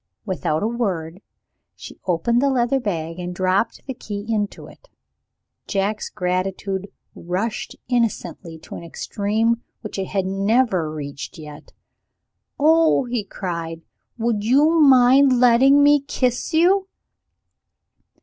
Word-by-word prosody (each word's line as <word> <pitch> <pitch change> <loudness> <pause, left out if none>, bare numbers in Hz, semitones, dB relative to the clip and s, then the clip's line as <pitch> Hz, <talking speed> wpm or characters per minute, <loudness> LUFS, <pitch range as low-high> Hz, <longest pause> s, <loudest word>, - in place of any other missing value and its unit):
Without 180 -5 -1
a - - +1
word, 190 -7 -3 0.5
she - - -12
opened 210 +8 +1
the 280 - +2
leather 260 +1 +1
bag 165 -6 -4
and 180 0 -5
dropped 185 +5 0
the 265 - -5
key 205 -4 -7
into 210 -3 -2
it. - - -17 0.8
Jack's 200 +2 -1
gratitude 190 +2 -2 0.3
rushed 190 +6 -4
innocently 230 -8 -2
to - - -13
an - - -7
extreme 215 +7 -1 0.2
which 210 -2 -6
it 190 - -3
had 195 -1 -1
never 195 -3 +1
reached 145 -2 -7
yet. 150 -2 -11 0.9
"Oh!" 320 0 +4
he 240 -3 -2
cried, 170 -4 -5 0.3
"would 225 -3 -1
you 295 +8 +4
mind 260 -1 +6
letting 260 +4 +5
me 290 0 +6
kiss 255 -3 -2
you?" 370 +4 +3
210 Hz, 120 wpm, -21 LUFS, 180-250 Hz, 0.9 s, mind